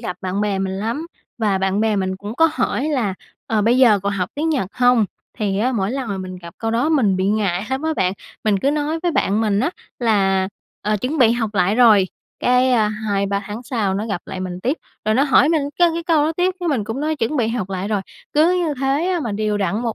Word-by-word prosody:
gặp 180 -7 -5
bạn 190 +1 -2
bè 205 -2 0
mình 190 0 -2
lắm 235 +11 -3 0.3
và 210 -4 +1
bạn 190 +1 0
bè 220 -1 +2
mình 190 -1 -1
cũng 205 +3 -7
có 325 +1 +4
hỏi 260 -2 -1
là 240 -10 0 0.3
"Ờ, 215 -2 +1
bây 235 +4 +3
giờ 235 -6 +6
còn 200 0 -1
học 185 -2 -2
tiếng 310 +3 -1
Nhật 280 - 0
hông?". 245 -2 +4 0.3
Thì 200 -3 0
á, 250 +5 +1
mỗi 200 -4 0
lần 260 -1 -3
mà 195 -1 -3
mình 185 0 -6
gặp 170 0 -11
câu 225 - -2
đó 240 +6 +1
mình 240 -12 +3
bị 185 0 0
ngại 200 -2 0
lắm 265 +2 -1
á 320 0 0
bạn. 185 0 +1 0.3
Mình 210 -2 +2
cứ 270 +8 +1
nói 300 +2 -1
với 350 - +1
bạn 205 -5 +1
mình 210 -2 +1
á 270 - +1 0.3
là 195 -5 +2 0.3
"Ờ, 215 0 +1
chuẩn 260 +9 -3
bị 230 -3 +5
học 230 -3 -1
lại 195 +2 +2
rồi", 215 -6 +5 0.3
cái, 250 +1 +3
a, 220 -3 +3
2-3 200 -2 -1
tháng 215 +4 -6
sau 220 -6 -1
nó 210 +3 -2
gặp 200 -5 -3
lại 185 - -6
mình 180 -1 -5
tiếp, 260 - 0 0.3
rồi 215 0 +2
nó 265 - +4
hỏi 280 -1 +4
mình 315 -3 +2 0.2
cái 350 -1 +6
cái 335 - -3
câu 325 -3 +2
đó 315 - 0
tiếp, 360 +1 +1
cái 350 - -1
mình 255 -8 0
cũng 225 +5 -4
nói: 310 +1 -1
"Chuẩn 285 +3 -1
bị 235 -4 +1
học 225 -5 -2 0.2
rồi". 210 -2 0 0.3
Cứ 315 +4 +4
như 300 - -1
thế 275 +5 +1
á 360 -2 0
mà 235 -8 -3
đều 210 0 -1
đặn 200 +2 0
1 235 -2 -2
220 Hz, 255 wpm, -20 LUFS, 200-270 Hz, 0.3 s, giờ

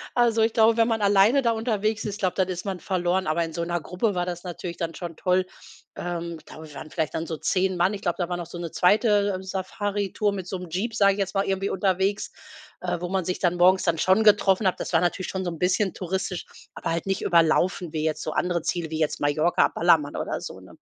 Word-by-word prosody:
Also 235 -2 +3
ich 225 0 +2
glaube, 225 0 +5
wenn 225 -1 +4
man 225 -2 0
alleine 205 +7 +5
da 235 - +3
unterwegs 220 -1 -1
ist, 205 0 -4
glaub, 185 -4 0
dann 190 -2 +1
ist 180 0 -5
man 190 -2 -3
verloren, 185 0 -1
aber 155 +2 +1
in 165 -1 -6
so 170 - -2
'ner 175 +1 -1
Gruppe 185 +5 -1
war 175 0 0
das 175 -1 -5
natürlich 175 -1 -6
dann 165 -2 -4
schon 170 -2 -6
toll. 185 0 +1 0.5
Ähm, 170 -1 -4
da - - -11 0.2
waren 155 - -9
vielleicht 155 -4 -2
dann 160 - -3
so 160 - -4
10 185 +4 0
Mann, 180 +4 +2
ich 200 - -6
glaube, 175 -4 -1
da 175 - -1
war 175 - -2
noch 175 - -5
so 175 - -9
'ne 170 -2 -5
2. 205 0 +3
Safaritour 200 +2 -2
mit 190 -3 -5
so 190 - -3
'nem 180 -1 -9
Jeep, 215 +6 -2
sag 200 -3 +5
ich 200 - -7
jetzt 195 0 -2
mal, 195 - +2
irgendwie 195 0 -1
unterwegs, 190 +1 0 0.5
äh, - - -2
wo 180 - -2
man 190 0 0
sich 180 - -2
dann 180 -1 +1
morgens 185 +2 +5
dann 170 -2 +1
schon 190 +6 +3
getroffen 205 -1 +4
hat, 185 - 0
das - - -5
war 165 - +4
natürlich 175 +1 -1
schon 190 -1 -3
so 175 - -1
'n 165 - -8
bisschen 185 +2 +1
touristisch, 185 0 -3 0.3
aber - - -3
halt 165 0 -2
nicht 195 0 -1
überlaufen, 170 0 +2
wie 155 -1 -2
jetzt 155 -1 -1
so 155 - -3
andere 175 0 -1
Ziele 170 -2 -2
wie 160 0 -4
jetzt 155 -2 0
Mallorca, 155 +4 +3
Ballermann 160 -4 +2
oder - - -3
so, - - -8
ne? - - -15
185 Hz, 245 wpm, -25 LUFS, 170-200 Hz, 0.5 s, glaube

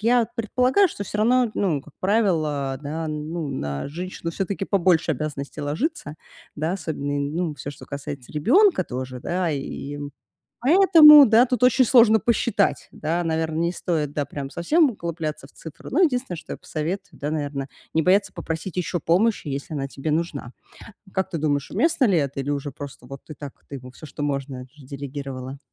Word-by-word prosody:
я 235 +1 +3
предполагаю, 250 - +2
что 205 - -6
всё 210 - -5
равно, 245 +3 +3
ну, 165 -8 0
как 150 - -18
правило, 155 -10 +1
да, 155 +3 -4
ну, 155 +1 -4
на 70 - -4
женщину 170 +2 -5
все-таки 195 +2 -3
побольше 175 -4 +2
обязанностей 145 +1 -5
ложится, 150 - -3 0.4
да? 155 +3 -1
Особенно, 145 -6 -3
ну, 155 +3 -2
всё, 145 +1 -7
что - - -12
касается 140 -2 -7
ребёнка 260 - +4
тоже, 130 0 -6
да. 175 +1 -1
И 140 0 -5 0.6
поэтому, 300 -1 +9
да, 225 +3 +6
тут 250 0 -2
очень 255 +1 +5
сложно 230 -2 +6
посчитать, 225 -3 +1
да. 165 +3 -2
Наверное, 160 -1 -1
не 170 +1 +1
стоит, 155 -5 -2
да, 145 - 0
прям 140 -1 -6
совсем 295 - +3
углубляться 165 - -5
в - - -20
цифры. 160 - -11
Ну, 345 +8 +3
единственное, 250 - -1
что - - -9
я - - -4
посоветую, 180 +6 -5
да, 145 - -2
наверное, 145 -3 -3 0.3
не 160 - +3
бояться 195 +4 +3
попросить 165 +1 -5
ещё 175 0 -1
помощи, 190 +2 +1
если 140 +3 -4
она 140 -2 -3
тебе 140 +3 -4
нужна. 150 -5 -2 0.6
Как 190 -1 -1
ты 170 - -3
думаешь, 145 -2 -1
уместно 315 -4 +2
ли 195 -6 +3
это, 140 -2 -1
или 135 - -3
уже 145 0 -2
просто 140 -2 -10
вот 135 +2 -9
ты 155 - -9
так, 140 -1 -8 0.2
ты 140 - -6
ему 125 -1 -9
всё, 140 - -12
что 145 - -6
можно, 135 -3 -3
делегировала? 135 -1 -7
160 Hz, 175 wpm, -23 LUFS, 140-200 Hz, 0.6 s, поэтому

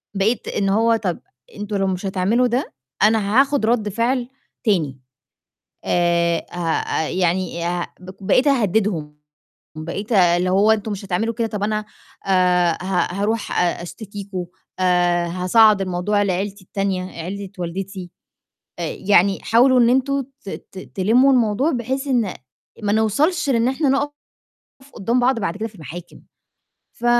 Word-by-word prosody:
بقيت 215 +5 0
إن 195 -1 0
هو 225 +3 +3
طَب 190 -6 -2 0.4
أنتم 205 0 -5
لو 195 0 +1
مش 185 +1 -3
هتعملوا 200 +7 +2
ده 245 +3 -2 0.3
أنا 215 +2 +4
هاخُد 275 -4 0
رَد 220 -3 +1
فعل 240 +4 0 0.4
تاني، 155 -11 +1 0.9
آآ 170 -1 +1
هأ 165 -2 -1
يعني 175 -1 -1
أه 175 0 -2
بق 185 +2 -12
بقيت 255 +8 +3
أهدّدهم، 200 - +1 0.6
بقيت 195 +8 -5
آآ 175 -4 +5
اللي 180 +1 0
هو 200 +4 +4
أنتم 215 0 -1
مش 195 0 -6
هتعملوا 220 +5 -1
كده 230 +1 -1
طَب 210 -2 -5
أنا 215 0 -1 0.4
آآ 180 -2 +3
ه 185 -2 0
هاروح 205 +2 -1
أ 175 -1 0
أشتكيكم 200 -1 -7 0.3
آآ 175 -1 +2
هاصعّد 195 +4 +4
الموضوع 185 +3 0
لعيلتي 195 +1 -2
التانية، 195 -1 -2 0.2
عيلة 195 +3 -6
والدتي 180 +1 -5 0.7
آآ - - -1
يعني 195 -1 +3
حاولوا 250 +3 +4
إن 235 - +5
أنتم 270 +2 +1 0.2
ت - - -6
ت 190 - -9 0.2
تلمّوا 235 +8 +4
الموضوع 245 +5 +2
بحيث 265 +3 -2
إن 235 -8 +1 0.5
ما 205 0 +1
نوصَلش 285 - +1
لإن 235 -2 +2
إحنا 270 +2 +1
نُقف 285 +2 +1 0.8
قدّام 235 +4 0
بعض 250 0 +2
بعد 195 -2 -2
كده 220 - -3
في 215 - -20
المحاكم 170 +1 -10 0.8
ف 240 - -5
200 Hz, 145 wpm, -21 LUFS, 180-230 Hz, 0.9 s, آآ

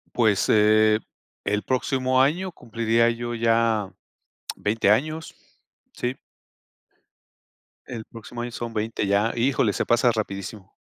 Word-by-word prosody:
Pues, 110 -5 +3
eh, 110 0 +5 0.5
el 105 0 0
próximo 130 0 0
año 175 +8 +1
cumpliría 115 -2 +1
yo 120 0 -3
ya 115 -3 +1 0.7
20 105 0 0
años, 155 +9 0 0.6
sí. 125 +1 -3 1.7
El 115 -3 -6
próximo 120 +1 -9
año 120 0 -5
son 115 0 -5
20, 110 -1 -2
ya. 100 +3 +2
Híjole, 120 -3 +2
se - - -1
pasa 120 +1 +4
rapidísimo. 100 -2 -5
115 Hz, 115 wpm, -24 LUFS, 110-120 Hz, 1.7 s, eh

